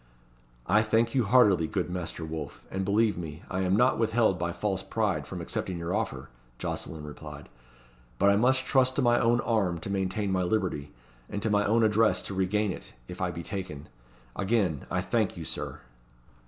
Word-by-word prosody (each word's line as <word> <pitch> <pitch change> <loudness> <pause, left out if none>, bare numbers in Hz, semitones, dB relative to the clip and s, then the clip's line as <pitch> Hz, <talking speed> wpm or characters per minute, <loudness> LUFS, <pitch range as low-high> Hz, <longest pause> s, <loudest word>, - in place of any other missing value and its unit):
"I 105 +7 +4
thank 115 +1 +2
you 130 -4 +2
heartily, 100 -7 +5
good 90 - -2
Master 85 -2 -4
Wolfe, 80 -3 -6
and 95 0 -2
believe 105 0 +2
me, 80 -1 -7
I 95 - -1
am 95 0 +2
not 125 +3 +3
withheld 110 -4 +2
by 85 0 -1
false 95 +1 -1
pride 95 -9 -1
from 90 -2 -6
accepting 90 +1 -3
your 85 +1 -3
offer," 80 -12 -2 0.3
Jocelyn 80 +4 -4
replied; 75 0 -9 0.7
"but 100 - +5
I - - +4
must 130 +4 +3
trust 130 -1 +3
to 140 - +1
my 120 0 +4
own 120 +1 +3
arm 100 -7 +1
to 100 - -5
maintain 95 +1 -1
my 95 -1 +1
liberty, 90 -7 -1 0.4
and 105 - -3
to 110 - +1
my 105 0 +3
own 115 +2 +3
address 110 +1 +3
to - - -5
regain 95 +2 +1
it, - - -9
if 90 - -8
I 90 - +1
be 85 0 -6
taken. 85 -7 -6 0.5
Again, 95 - 0
I - - 0
thank - - 0
you, - - -6
Sir." - - -4
95 Hz, 190 wpm, -28 LUFS, 85-110 Hz, 0.7 s, heartily